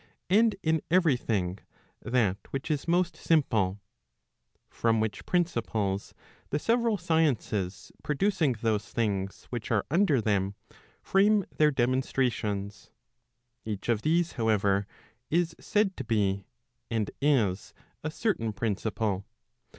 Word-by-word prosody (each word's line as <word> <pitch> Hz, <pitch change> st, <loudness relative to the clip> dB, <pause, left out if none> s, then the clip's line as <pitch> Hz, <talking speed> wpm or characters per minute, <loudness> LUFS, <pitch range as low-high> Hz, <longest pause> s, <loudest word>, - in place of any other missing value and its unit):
m 195 Hz, -, +6 dB
and 225 Hz, -2 st, +3 dB
in 160 Hz, -1 st, +2 dB
every 170 Hz, -5 st, +4 dB
thing, 100 Hz, -6 st, -2 dB, 0.4 s
that 115 Hz, -6 st, +1 dB
which 135 Hz, +3 st, -3 dB
is 150 Hz, 0 st, -2 dB
most 175 Hz, +1 st, +2 dB
simple; 110 Hz, -, +1 dB, 0.9 s
from 115 Hz, -1 st, +1 dB
which 110 Hz, -1 st, -3 dB
principles 110 Hz, -, -1 dB, 0.3 s
the 145 Hz, -, 0 dB
several 230 Hz, +5 st, +1 dB
sciences 135 Hz, -, 0 dB
producing 160 Hz, -2 st, +1 dB
those 110 Hz, -2 st, 0 dB
things 100 Hz, -4 st, -2 dB
which 120 Hz, -3 st, -4 dB
are 105 Hz, -4 st, +1 dB
under 170 Hz, -5 st, +3 dB
them, 100 Hz, -3 st, 0 dB, 0.5 s
frame 200 Hz, 0 st, +3 dB
their 150 Hz, -1 st, +5 dB
demonstrations. 120 Hz, -6 st, -1 dB, 0.7 s
Each 105 Hz, 0 st, -5 dB
of 115 Hz, -3 st, +2 dB
these, 170 Hz, +4 st, +2 dB
however, 100 Hz, -3 st, +1 dB, 0.4 s
is 165 Hz, 0 st, +1 dB
said 205 Hz, -2 st, +1 dB
to -, -, -4 dB
be, 100 Hz, -4 st, 0 dB, 0.4 s
and 110 Hz, -3 st, -1 dB
is, 115 Hz, -10 st, +2 dB, 0.3 s
a 155 Hz, -, -1 dB
certain 155 Hz, -, -1 dB
principle. 105 Hz, -2 st, -2 dB
120 Hz, 120 wpm, -28 LUFS, 105-165 Hz, 0.9 s, m